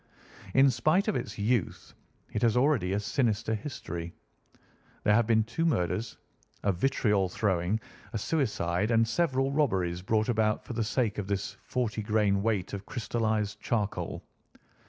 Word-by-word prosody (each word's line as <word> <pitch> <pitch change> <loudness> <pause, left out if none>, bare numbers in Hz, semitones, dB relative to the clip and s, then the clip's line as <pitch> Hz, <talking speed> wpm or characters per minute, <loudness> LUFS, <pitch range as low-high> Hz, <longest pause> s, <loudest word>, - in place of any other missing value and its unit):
In 135 0 +6
spite 155 - +2
of 215 - +1
its - - -4
youth, 110 0 -1 0.4
it 105 - -1
has 120 0 +3
already 125 -9 +2
a 100 - +1
sinister 110 +1 0
history. 85 - -5 0.9
There 105 - +4
have 115 0 +3
been 110 -1 +4
two 120 +9 -3
murders, 110 - 0 0.5
a 100 - +3
vitriol 105 -2 +1
throwing, 95 +1 0 0.3
a - - -2
suicide, 105 - 0
and 115 -1 +3
several 135 0 +1
robberies 95 - +1
brought 110 +3 +1
about 110 -2 +1
for - - -6
the 115 -1 0
sake 110 -1 0
of 100 - -4
this 100 0 -2
forty 115 -4 -2
grain 105 -2 +2
weight 105 -4 -1
of 100 0 -6
crystallised 110 -3 -1
charcoal. 105 -4 -2
110 Hz, 150 wpm, -29 LUFS, 100-120 Hz, 0.9 s, In